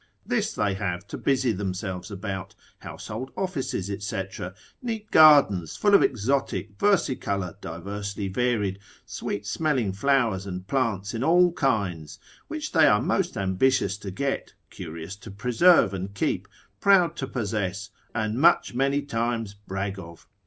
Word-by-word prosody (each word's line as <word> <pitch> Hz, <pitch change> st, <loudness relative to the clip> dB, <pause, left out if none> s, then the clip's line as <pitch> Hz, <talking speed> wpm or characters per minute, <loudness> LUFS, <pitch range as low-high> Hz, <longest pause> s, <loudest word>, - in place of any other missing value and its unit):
This -, -, 0 dB
they 105 Hz, -2 st, 0 dB
have 95 Hz, -2 st, -3 dB
to -, -, -5 dB
busy 130 Hz, -3 st, +2 dB
themselves 95 Hz, -1 st, -4 dB
about, 95 Hz, -2 st, -5 dB, 0.2 s
household 125 Hz, +5 st, -7 dB
offices, 155 Hz, -, -2 dB, 0.2 s
&c., 100 Hz, 0 st, -2 dB, 0.6 s
neat 225 Hz, -4 st, -5 dB
gardens, 140 Hz, -, +6 dB
full 205 Hz, -1 st, +2 dB
of 200 Hz, -, +8 dB
exotic, 120 Hz, -3 st, 0 dB
versicolour, 125 Hz, -, +1 dB
diversely 100 Hz, +4 st, -5 dB
varied, 105 Hz, -2 st, 0 dB, 0.3 s
sweet 100 Hz, 0 st, -4 dB
smelling 130 Hz, -4 st, 0 dB
flowers, 115 Hz, -4 st, +1 dB
and 90 Hz, -1 st, -5 dB
plants 110 Hz, -7 st, -1 dB
in 115 Hz, +2 st, -2 dB
all 175 Hz, +3 st, +5 dB
kinds, 100 Hz, -, -1 dB, 0.3 s
which 310 Hz, -1 st, -5 dB
they 160 Hz, -3 st, +5 dB
are 105 Hz, -, +5 dB
most 180 Hz, -, 0 dB
ambitious 100 Hz, +2 st, +1 dB
to 100 Hz, -, -6 dB
get, 135 Hz, +9 st, -3 dB, 0.2 s
curious 80 Hz, +4 st, -7 dB
to 100 Hz, +2 st, -11 dB
preserve 125 Hz, -, +4 dB
and 95 Hz, +1 st, -5 dB
keep, -, -, -1 dB, 0.3 s
proud 190 Hz, -, +4 dB
to 135 Hz, -, -3 dB
possess, 100 Hz, -4 st, -3 dB, 0.2 s
and 110 Hz, +1 st, -1 dB
much 170 Hz, -5 st, +4 dB
many 140 Hz, +3 st, +1 dB
times 115 Hz, -4 st, -2 dB
brag 100 Hz, -1 st, -5 dB
of. 85 Hz, -2 st, -12 dB
105 Hz, 140 wpm, -26 LUFS, 95-135 Hz, 0.6 s, of